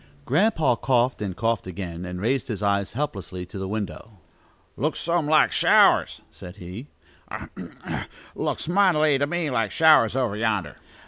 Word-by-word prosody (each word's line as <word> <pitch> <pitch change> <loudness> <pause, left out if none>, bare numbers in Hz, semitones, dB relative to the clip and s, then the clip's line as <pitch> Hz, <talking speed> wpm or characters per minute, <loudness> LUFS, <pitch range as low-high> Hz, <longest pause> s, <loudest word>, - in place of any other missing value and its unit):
Grandpa 160 - +2
coughed, 125 -1 +1
and 95 -4 -4
coughed 115 -2 -1
again, 90 -2 -6
and 90 0 -6
raised 120 +6 -1
his 105 -3 -4
eyes 100 -1 0
helplessly 95 -9 -4
to 95 +2 -9
the 95 - -4
window. 105 0 -5 0.6
"Looks 155 +4 -2
some 170 -2 0
like 155 0 +4
showers," - - +3
said 90 0 -11
he. 95 +7 -9 0.4
"A - - -7
hem! - - -11
a - - -8
hem! - - -6 0.3
Looks - - -3
mightily 165 -6 +3
to 145 - +1
me 170 -2 -2
like 115 -4 0
showers, 150 -3 +4
over 125 -6 0
yonder." 105 -8 -2
115 Hz, 170 wpm, -24 LUFS, 95-150 Hz, 0.6 s, like